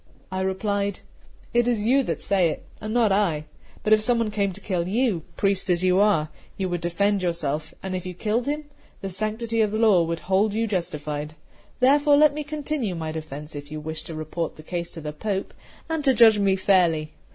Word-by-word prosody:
I 190 0 -2
replied: 200 +1 -1 0.5
"It 240 0 +3
is 225 -4 +1
you 265 +4 +4
that 165 - -3
say 185 -4 +2
it, - - -6 0.2
and 215 0 -4
not 230 -3 +3
I; 175 -7 +1 0.4
but 215 - +4
if 215 - +5
some 240 +2 +3
one 230 -2 0
came 200 -2 0
to 190 - -9
kill 180 -4 -2
you, 215 -3 +1 0.2
priest 195 -1 +1
as 175 0 +2
you 185 0 +4
are, 200 -7 +3 0.3
you 190 -1 -1
would 175 -1 -2
defend 200 +4 +1
yourself, 155 -3 -2
and 190 -1 -3
if 180 - -3
you 180 -1 -6
killed 225 +7 -1
him, 300 +1 -2 0.4
the 195 - -4
sanctity 220 +4 -1
of 215 -1 +1
law 215 -5 +5
would 165 0 -2
hold 200 +3 +1
you 225 +1 +1
justified. 150 -6 -3 0.5
Therefore 285 +2 +5
let 300 -1 +6
me 300 +1 -4
continue 290 - -3
my 160 -1 -4
defence, 150 -1 -7
if 145 0 -8
you 155 - -4
wish 160 +1 -5
to 165 - -7
report 155 +1 -4
the 155 - -12
case 170 +1 -4
to 165 - -8
the 150 0 -5
Pope, 195 +4 -3 0.3
and 320 -2 -2
to 265 -3 +4
judge 225 -3 +7
me 195 -1 +3
fairly. 170 -5 +2
195 Hz, 210 wpm, -24 LUFS, 170-220 Hz, 0.5 s, judge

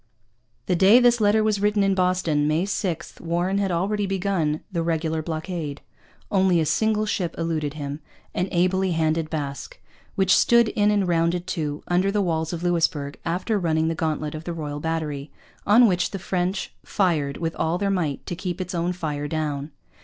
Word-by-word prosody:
The 180 - +1
day 195 +7 +7
this 240 -2 +4
letter 215 +1 +4
was 210 -2 +1
written 205 0 +2
in 195 0 +3
Boston, 180 -5 +1
May 155 +4 +1
6, 180 -4 -3
Warren 175 +4 0
had 195 -1 0
already 200 +4 0
begun 185 -5 0
the 170 -3 -1
regular 160 -1 -1
blockade. 160 -2 -4 0.5
Only 190 -3 +3
a 160 - +1
single 215 +7 +1
ship 185 -5 -2
eluded 155 -3 -2
him, 145 -1 -5 0.3
an 180 - -1
ably 185 +1 +2
handled 160 0 0
Basque, 145 -3 -5 0.4
which 190 -2 +4
stood 235 -1 +5
in 210 -2 +2
and 205 -3 +2
rounded 170 +1 +1
to, 150 -3 -3
under 180 +2 +2
the 210 - 0
walls 160 -4 0
of 170 -1 -5
Louisbourg, 160 -5 0
after 185 +6 0
running 160 -2 +1
the - - 0
gauntlet 155 -2 -2
of 155 0 -6
the 175 - -3
Royal 150 -3 -5
Battery, 150 -3 -3 0.4
on 230 +4 +7
which 180 -3 +1
the 195 - -5
French 185 +1 -2
fired 155 -8 0
with 165 0 -3
all 165 +2 0
their 200 +1 0
might 160 -7 -1
to 175 - -4
keep 180 0 -4
its 180 0 -4
own 175 +1 0
fire 150 -4 -3
down. 150 -2 -2
170 Hz, 185 wpm, -24 LUFS, 155-190 Hz, 0.5 s, day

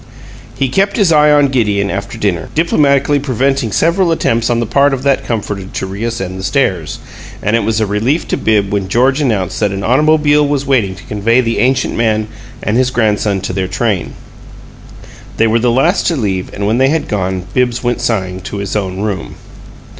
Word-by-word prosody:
He 135 - 0
kept 195 +9 0
his 200 -6 +3
eye 150 -1 +5
on 145 -2 +4
Gideon 105 -6 0
after 100 0 -5
dinner, 90 -5 -2
diplomatically 145 -3 +2
preventing 135 -2 0
several 170 - +2
attempts 115 -7 0
on 120 -1 +1
the 120 - 0
part 140 +5 +2
of 130 - -8
that 140 -1 +1
comforter 105 -4 -3
to - - -3
reascend 95 -1 -4
the - - -6
stairs; 95 - -1 0.5
and 105 +3 +1
it 115 - +1
was 110 +1 0
a 110 - +1
relief 110 +10 -1
to - - +1
Bibbs 105 -3 +1
when 100 -2 -1
George 130 +8 +2
announced 105 -10 -1
that 105 - +1
an 100 0 -4
automobile 150 +4 +3
was 140 -1 -1
waiting 115 -9 +1
to 95 - -13
convey 110 +4 +1
the 115 -2 0
ancient 130 +1 +1
man 110 -2 0 0.3
and 105 +2 0
his 130 0 +2
grandson 105 -5 0
to 95 - -4
their 95 0 -1
train. 95 -1 -2 1.2
They 115 - +3
were 115 +1 +2
the 120 +1 +1
last 135 +10 +2
to 170 - +1
leave, 95 -8 -2
and 100 - -4
when 110 +4 +1
they 135 +1 +4
had 160 +1 -1
gone 95 -3 -2
Bibbs 125 -1 0
went 120 0 -1
sighing 95 -5 -1
to 100 +2 -7
his 100 0 -4
own 95 -2 -2
room. 100 -5 -4
115 Hz, 200 wpm, -14 LUFS, 100-135 Hz, 1.2 s, eye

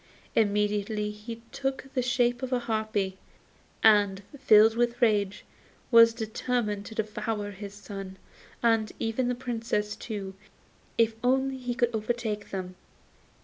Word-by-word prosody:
Immediately 210 0 +1
he 225 +2 -9
took 270 0 -4
the 255 - +1
shape 245 -1 +1
of 260 0 -4
a 255 - +3
harpy, 215 -5 -2 0.6
and, 205 -3 +5 0.2
filled 220 -3 +6
with 240 0 +1
rage, 205 -4 +1 0.5
was 230 -1 +8
determined 220 -2 -2
to 220 - -9
devour 215 -1 -3
his 200 +1 -8
son, 195 -2 -8 0.5
and 225 -3 +3
even 225 +3 -1
the 250 - 0
Princess 230 -4 -2
too, 200 -4 -6 0.6
if 230 -1 +3
only 265 +1 +2
he 245 -1 -3
could 240 -1 +1
overtake 220 -1 -2
them. 185 -1 -5
220 Hz, 130 wpm, -28 LUFS, 205-240 Hz, 0.6 s, was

